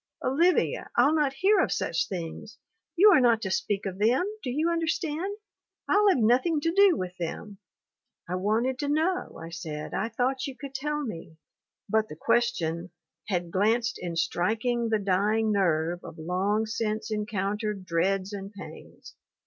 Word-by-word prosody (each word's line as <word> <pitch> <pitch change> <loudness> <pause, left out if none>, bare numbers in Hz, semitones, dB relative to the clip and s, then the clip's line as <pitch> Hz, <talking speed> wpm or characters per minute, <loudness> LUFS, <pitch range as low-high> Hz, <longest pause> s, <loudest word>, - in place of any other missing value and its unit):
'Olivia, 335 +7 +2
I'll 265 +6 +5
not 300 -3 +2
hear 385 +8 +3
of - - +2
such - - 0
things! 180 +4 -6 0.4
You 410 +4 +7
are 320 - +6
not 235 -3 +4
to 190 - -2
speak 200 +1 -1
of 190 -1 -4
them, 240 - +3 0.2
do 255 - -4
you 300 +6 0
understand! 335 +3 -2 0.5
I'll 415 0 +4
have 370 - +3
nothing 255 +8 +3
to 330 - +1
do 395 -2 +5
with 180 -1 -4
them 195 +4 -6 0.2
!' - - -64
" - - -51
'I 180 - -2
wanted 225 +7 0
to 290 - -2
know/ 320 +6 0
I 165 +1 -8
said. 155 -3 -6
'I 225 - -1
thought 255 +4 -1
you 265 -2 -8
could 280 -2 -8
tell 295 +2 -2
me... 165 - -7 0.3
." - - -64
But 220 +1 +1
the - - -7
question 170 -5 0 0.4
"had 175 -4 -2
glanced 225 +5 +1
in 175 -2 -4
striking 220 +8 0
the 220 - +2
dying 210 +3 +1
nerve 175 -3 +1
of - - -9
Jong 190 +6 0
since 220 0 -3
encountered 210 -1 -2
dreads 185 +3 0
and 195 0 -6
pains. 200 -3 -12
220 Hz, 175 wpm, -27 LUFS, 185-270 Hz, 0.5 s, You